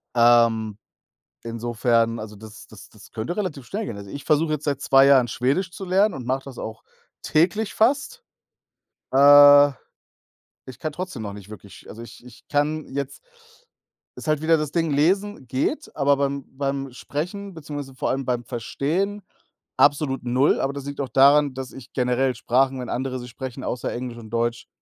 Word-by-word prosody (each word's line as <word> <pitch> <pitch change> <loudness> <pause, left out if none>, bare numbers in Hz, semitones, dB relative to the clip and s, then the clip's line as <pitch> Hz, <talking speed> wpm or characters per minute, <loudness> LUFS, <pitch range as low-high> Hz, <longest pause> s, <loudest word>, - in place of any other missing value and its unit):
ähm, 115 -3 +4 0.7
insofern 115 0 0
also 105 -1 -9
das 110 +1 -12
das - - -14
das - - -17
könnte 115 +11 -4
relativ 165 -11 -4
schnell 210 +2 -4
gehen. 105 - -6
Also, 100 -1 -10
ich 140 - -8
versuche 155 0 +2
jetzt 150 -1 -3
seit 140 -2 -1
2 135 0 +5
Jahren, 130 -4 +5
Schwedisch 140 - -1
zu 195 - -7
lernen, 195 +3 +2
und 125 -3 -7
mache 135 +1 -1
das 135 -3 -10
auch 110 0 -7 0.4
täglich 185 +7 +1
fast. 280 - +1 0.9
Äh, 145 +1 +8 1.0
ich 130 -1 -11
kann 155 - -3
trotzdem 180 -9 -6
noch 100 -2 -5
nicht 100 0 -12
wirklich 100 -3 -13
also 115 - -10
ich 120 - -12
ich 125 -2 -16
kann 150 +1 -1
jetzt 140 -1 -4 0.9
ist - - -10
halt 155 0 +1
wieder 165 0 +4
das 150 -1 -3
Ding, 165 -3 0
lesen 185 +2 0
geht, 135 - -2
aber 140 -1 +2
beim 140 -1 -1
beim 135 -1 -2
Sprechen, 180 - -5
beziehungsweise 145 -4 -7
vor - - -2
allem 135 0 -2
beim 120 -1 -1
Verstehen, 170 - -2 0.5
absolut 140 -3 +2
null, 125 +3 +2
aber 135 +1 -1
das 140 -1 -7
liegt 140 0 -5
auch 130 - -4
daran, 140 +2 +5
dass 130 -1 -6
ich 135 - -13
generell 125 0 +1
Sprachen, 130 +1 +1
wenn 125 - -6
andere 130 0 -3
sie 125 - -8
sprechen, 130 +1 -7
außer 125 - -3
Englisch 120 -1 -6
und 110 -2 -11
Deutsch 120 0 -2
135 Hz, 175 wpm, -23 LUFS, 120-150 Hz, 1.0 s, Äh